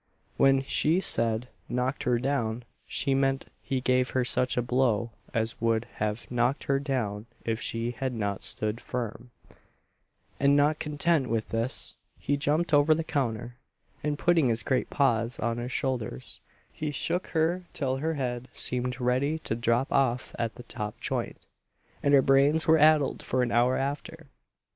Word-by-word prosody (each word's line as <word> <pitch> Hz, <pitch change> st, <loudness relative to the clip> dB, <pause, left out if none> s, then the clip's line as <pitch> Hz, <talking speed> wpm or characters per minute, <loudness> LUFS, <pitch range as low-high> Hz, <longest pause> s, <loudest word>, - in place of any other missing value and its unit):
When 135 Hz, 0 st, +4 dB
she 150 Hz, +5 st, +2 dB
said 115 Hz, -8 st, +1 dB, 0.2 s
"knocked 125 Hz, +2 st, -1 dB
her 125 Hz, -1 st, +3 dB
down," 120 Hz, -3 st, -1 dB, 0.2 s
she 135 Hz, -, 0 dB
meant 135 Hz, 0 st, +1 dB, 0.2 s
he 130 Hz, -1 st, -2 dB
gave 125 Hz, 0 st, +2 dB
her 125 Hz, -, +2 dB
such 125 Hz, +1 st, 0 dB
a 125 Hz, -, +2 dB
blow 120 Hz, -2 st, +1 dB, 0.2 s
as 115 Hz, -2 st, -2 dB
would 115 Hz, 0 st, +1 dB
have 105 Hz, +2 st, -2 dB
knocked 120 Hz, +2 st, +1 dB
her 135 Hz, 0 st, +1 dB
down 115 Hz, -7 st, -2 dB, 0.2 s
if 115 Hz, 0 st, -1 dB
she 115 Hz, +1 st, -2 dB
had 130 Hz, +2 st, -3 dB
not 100 Hz, -4 st, -2 dB
stood 110 Hz, +2 st, -2 dB
firm; 120 Hz, 0 st, -5 dB, 1.1 s
and 140 Hz, +1 st, +4 dB
not 150 Hz, +1 st, +3 dB
content 150 Hz, -1 st, +1 dB
with 115 Hz, -1 st, -1 dB
this, 115 Hz, +3 st, -1 dB, 0.2 s
he 145 Hz, -, 0 dB
jumped 150 Hz, +4 st, 0 dB
over 145 Hz, +2 st, +5 dB
the 165 Hz, -, -2 dB
counter, 120 Hz, -5 st, -2 dB, 0.5 s
and 150 Hz, 0 st, -1 dB
putting 170 Hz, -4 st, +3 dB
his 115 Hz, -1 st, 0 dB
great 130 Hz, -, 0 dB
paws 120 Hz, -4 st, +1 dB
on 115 Hz, +1 st, -1 dB
her 120 Hz, +1 st, -4 dB
shoulders, 125 Hz, -, -3 dB, 0.3 s
he 150 Hz, -, -4 dB
shook 175 Hz, +5 st, -1 dB
her 170 Hz, +3 st, 0 dB
till 135 Hz, -3 st, -1 dB
her 160 Hz, +4 st, -1 dB
head 125 Hz, -2 st, -3 dB
seemed 125 Hz, 0 st, 0 dB
ready 130 Hz, +5 st, +1 dB
to -, -, -2 dB
drop 115 Hz, +3 st, +1 dB
off 130 Hz, -3 st, +1 dB
at 115 Hz, -1 st, -2 dB
the 125 Hz, -, -10 dB
top 105 Hz, -3 st, -5 dB
joint, -, -, -4 dB, 0.6 s
and 140 Hz, 0 st, +4 dB
her 135 Hz, -, +6 dB
brains 140 Hz, +4 st, +4 dB
were 160 Hz, 0 st, +6 dB
addled 150 Hz, -2 st, +4 dB
for 130 Hz, -1 st, 0 dB
an 120 Hz, -, -1 dB
hour 120 Hz, +2 st, +3 dB
after. 140 Hz, +2 st, -4 dB
130 Hz, 165 wpm, -28 LUFS, 120-140 Hz, 1.1 s, her